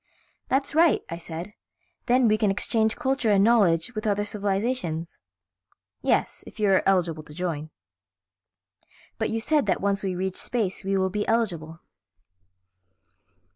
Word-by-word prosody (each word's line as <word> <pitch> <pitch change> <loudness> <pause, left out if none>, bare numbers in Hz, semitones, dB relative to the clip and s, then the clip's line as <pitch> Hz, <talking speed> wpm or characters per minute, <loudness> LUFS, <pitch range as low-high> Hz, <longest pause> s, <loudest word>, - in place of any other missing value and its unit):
"That's 275 +1 0
all 320 - +6
right," 335 -2 +3
I 170 - -4
said, 170 +4 -7 0.5
"then 250 0 +4
we 215 - +4
can 215 -1 +1
exchange 220 +2 +1
culture 265 -3 0
and 200 -1 +4
knowledge 205 -3 +3
with 215 0 -3
other 205 0 +1
civilizations." 200 - -2 0.8
"Yes, - - 0
if - - -13
you 210 -2 +2
are 190 - +4
eligible 175 -5 +1
to 150 -1 -13
join." 160 -3 -3 1.5
"But - - 0
you 225 - -1
said 295 +5 +1
that - - +1
once 200 0 0
we 190 -2 -2
reach 185 +1 -3
space 215 -7 -2
we 195 0 0
will 190 0 0
be 210 +1 -2
eligible." 170 -8 -1
200 Hz, 150 wpm, -25 LUFS, 175-225 Hz, 1.5 s, all